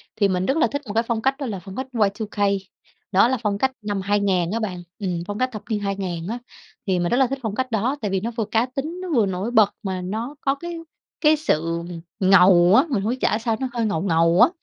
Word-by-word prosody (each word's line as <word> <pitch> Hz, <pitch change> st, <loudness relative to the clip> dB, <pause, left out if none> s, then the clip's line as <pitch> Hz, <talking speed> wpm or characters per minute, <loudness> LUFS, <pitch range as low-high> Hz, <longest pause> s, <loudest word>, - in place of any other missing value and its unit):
thì 200 Hz, -2 st, +3 dB
mình 185 Hz, -1 st, 0 dB
rất 270 Hz, +4 st, +1 dB
là 325 Hz, -, +4 dB
thích 285 Hz, 0 st, -4 dB
một 205 Hz, -, -4 dB
cái 230 Hz, +1 st, +2 dB
phong 230 Hz, -2 st, -1 dB
cách 270 Hz, +2 st, +1 dB
đó 280 Hz, -, -4 dB
là 200 Hz, -6 st, -4 dB
phong 190 Hz, +3 st, -10 dB
cách 260 Hz, +1 st, -4 dB
Y2K, 210 Hz, -1 st, -1 dB, 0.7 s
đó 195 Hz, +5 st, +5 dB
là 260 Hz, 0 st, +1 dB
phong 200 Hz, -1 st, 0 dB
cách 265 Hz, +4 st, +1 dB
năm 205 Hz, -2 st, -2 dB
2000 195 Hz, -3 st, +1 dB
á 230 Hz, -, -1 dB
bạn 180 Hz, -5 st, -4 dB, 0.2 s
ừm, 180 Hz, -4 st, -2 dB
phong 205 Hz, 0 st, -4 dB
cách 255 Hz, 0 st, +1 dB
thập 215 Hz, -, -7 dB
niên 215 Hz, -2 st, 0 dB
2000 190 Hz, -4 st, -3 dB
á. 235 Hz, +3 st, -3 dB, 0.5 s
Thì 185 Hz, -2 st, +2 dB
mình 175 Hz, -, 0 dB
rất 245 Hz, -, +3 dB
là 265 Hz, -2 st, +4 dB
thích 275 Hz, +1 st, -4 dB
phong 215 Hz, -3 st, -3 dB
cách 255 Hz, 0 st, -2 dB
đó 230 Hz, +6 st, 0 dB
tại 205 Hz, -2 st, -2 dB
vì 190 Hz, -, +1 dB
nó 230 Hz, +2 st, -3 dB
vừa 225 Hz, -2 st, -2 dB
cá 225 Hz, +3 st, +1 dB
tính, 305 Hz, +8 st, -5 dB
nó 370 Hz, -, -5 dB
vừa 220 Hz, -4 st, +4 dB
nổi 190 Hz, +5 st, -3 dB
bật 215 Hz, -4 st, +4 dB
mà 190 Hz, -2 st, -3 dB
nó 225 Hz, +10 st, -4 dB
có 275 Hz, 0 st, +1 dB
cái 345 Hz, +3 st, -6 dB, 0.4 s
cái 310 Hz, 0 st, +5 dB
sự 165 Hz, -, -1 dB, 0.4 s
ngầu 185 Hz, -1 st, +6 dB
á, -, -, +7 dB
mình 220 Hz, -8 st, 0 dB
hông 215 Hz, -, 0 dB
biết 255 Hz, -, -1 dB
trả 215 Hz, -, +2 dB
sao 225 Hz, -1 st, -1 dB
nó 260 Hz, -, -1 dB
hơi 230 Hz, -2 st, 0 dB
ngầu 165 Hz, -6 st, 0 dB
ngầu 170 Hz, +1 st, +3 dB
á. 245 Hz, -, +8 dB
210 Hz, 265 wpm, -23 LUFS, 190-250 Hz, 0.7 s, á